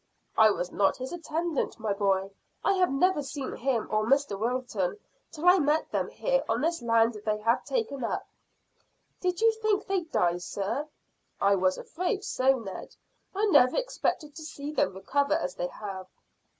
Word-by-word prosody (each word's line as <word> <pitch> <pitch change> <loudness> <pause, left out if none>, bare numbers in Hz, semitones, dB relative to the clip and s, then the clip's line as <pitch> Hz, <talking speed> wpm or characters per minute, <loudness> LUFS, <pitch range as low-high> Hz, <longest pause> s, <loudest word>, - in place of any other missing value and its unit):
"I 220 -1 +7
was 180 -3 -2
not 195 -1 +2
his 260 +5 -6
attendant, 330 -4 -2
my 220 -2 0
boy. 195 -1 +1 0.3
I 395 - +3
had 370 -4 +2
never 300 +4 +2
seen 275 -1 -5
him 240 -3 -1
or 215 0 +2
Mr 275 -1 +2
Wilton 230 - -1 0.3
till 320 +3 -3
I 365 +1 +7
met 300 +1 +1
them - - -1
here - - 0
on - - +1
this 335 +2 0
land 230 -1 +3
they 215 -1 0
have 230 +2 +2
taken 425 - -2
up." 230 - -2 0.9
"Did 360 0 -1
you 455 0 +6
think 430 -2 +1
they'd 365 -5 -2
die, 175 0 +2
sir?" 200 - -3 0.5
"I 200 0 +4
was 185 -1 +2
afraid 365 +4 -3
so, 265 +1 +2
Ned. 195 -6 -8 0.4
I 410 +2 +2
never 250 -5 +5
expected 320 -11 -1
to - - -7
see 295 -1 -6
them 290 -9 0
recover 280 +9 +1
as 180 - -2
they 175 - -3
have." 190 -1 -7
265 Hz, 175 wpm, -28 LUFS, 210-335 Hz, 0.9 s, I